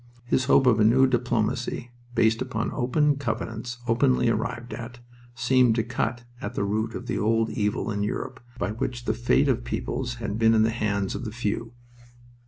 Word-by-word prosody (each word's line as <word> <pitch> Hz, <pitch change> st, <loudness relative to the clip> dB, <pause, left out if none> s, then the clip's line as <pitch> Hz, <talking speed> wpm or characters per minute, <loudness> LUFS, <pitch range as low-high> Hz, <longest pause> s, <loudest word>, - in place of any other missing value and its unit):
His 130 Hz, +1 st, +1 dB
hope 135 Hz, 0 st, +5 dB
of 120 Hz, -4 st, +4 dB
a -, -, +5 dB
new 125 Hz, +5 st, +6 dB
diplomacy, 120 Hz, -1 st, -1 dB, 0.2 s
based 110 Hz, -1 st, +3 dB
upon 115 Hz, +1 st, -2 dB
"open 145 Hz, +3 st, +2 dB
covenants 120 Hz, -2 st, -4 dB
openly 125 Hz, +1 st, +3 dB
arrived 115 Hz, +2 st, -2 dB
at," 120 Hz, 0 st, -7 dB, 0.4 s
seemed 125 Hz, -1 st, +3 dB
to 115 Hz, -, +1 dB
cut 120 Hz, 0 st, -2 dB, 0.2 s
at -, -, -5 dB
the -, -, 0 dB
root 105 Hz, +3 st, -1 dB
of -, -, -6 dB
the -, -, -2 dB
old 115 Hz, +1 st, +1 dB
evil 105 Hz, +1 st, -1 dB
in 105 Hz, 0 st, -2 dB
Europe 105 Hz, -, -3 dB, 0.2 s
by 100 Hz, -3 st, -1 dB
which 120 Hz, +2 st, -4 dB
the 110 Hz, -, +1 dB
fate 120 Hz, +5 st, +2 dB
of 125 Hz, -3 st, +1 dB
peoples 120 Hz, 0 st, -3 dB
had 110 Hz, -2 st, -4 dB
been 115 Hz, 0 st, +5 dB
in 110 Hz, -, +5 dB
the 115 Hz, -, +2 dB
hands 100 Hz, -4 st, -1 dB
of -, -, -5 dB
the 110 Hz, -, -4 dB
few. 115 Hz, 0 st, -3 dB
115 Hz, 190 wpm, -26 LUFS, 110-125 Hz, 0.4 s, new